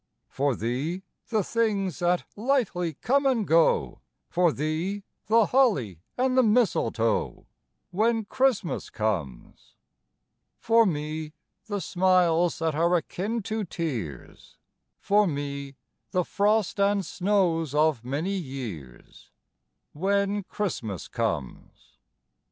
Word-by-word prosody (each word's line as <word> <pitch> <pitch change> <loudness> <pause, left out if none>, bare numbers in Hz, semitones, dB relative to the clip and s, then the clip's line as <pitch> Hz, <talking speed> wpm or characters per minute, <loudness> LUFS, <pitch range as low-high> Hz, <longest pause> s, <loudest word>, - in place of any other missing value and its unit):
For 140 -1 0
thee, 135 - -3 0.3
the 220 -3 +1
things 200 -5 0
that 175 0 +1
lightly 210 - 0
come 275 +3 +3
and 240 -6 +1
go, 160 - +3 0.3
For 175 -1 +3
thee, 160 +8 -2 0.2
the 225 +1 +5
holly 145 - +2 0.2
and 255 0 +1
the 260 - +6
mistletoe, 200 - +1 0.5
When 220 +3 +1
Christmas 255 -6 0
comes. 90 - -4 0.8
For 230 -1 +4
me, 155 -1 -3 0.3
the 205 -2 -2
smiles 175 -1 +2
that 165 -1 0
are 170 +4 +2
akin 205 +6 -2
to 220 +1 -2
tears, 140 - -6 0.4
For 205 0 +3
me, 140 -2 -4 0.3
the 180 -1 0
frost 210 0 +1
and 200 -1 +2
snows 175 -6 0
of 150 -6 +2
many 145 +10 -2
years, 115 - -8 0.6
When 200 +4 0
Christmas 155 - -4
comes. 65 - -5
175 Hz, 105 wpm, -26 LUFS, 145-210 Hz, 0.8 s, the